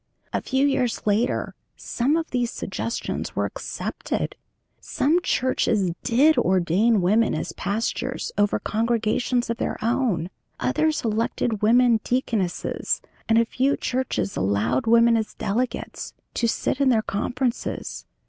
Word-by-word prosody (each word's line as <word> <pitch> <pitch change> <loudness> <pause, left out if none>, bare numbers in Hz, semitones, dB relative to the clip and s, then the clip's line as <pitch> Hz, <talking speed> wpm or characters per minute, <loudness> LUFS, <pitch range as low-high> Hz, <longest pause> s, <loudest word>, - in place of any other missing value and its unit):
A - - 0
few 265 +1 +1
years 255 -4 0
later 215 +4 +1 0.2
some 275 +6 0
of 325 -1 -3
these 245 -2 0
suggestions 230 +2 -4
were - - +1
accepted. - - -4 0.4
Some 325 +6 +1
churches 225 - +1
did 275 +6 +4
ordain 190 +4 +3
women 215 +5 +3
as - - -3
pastors 230 +5 -2
over 205 0 +2
congregations 230 +2 0
of 230 - -3
their - - -2
own, 225 -8 0 0.3
others 300 - +1
elected 220 0 -1
women 235 +1 +5
deaconesses, 225 -8 -1 0.3
and 225 - +5
a 230 - +4
few 265 +4 +1
churches 255 -5 -2
allowed 100 - 0
women, 230 0 +5
as 220 -1 -2
delegates, 235 +5 -3 0.2
to 235 - +1
sit 260 +4 -1
in 275 - +4
their 225 -3 +3
conferences. 240 +5 -3
230 Hz, 130 wpm, -24 LUFS, 210-255 Hz, 0.4 s, women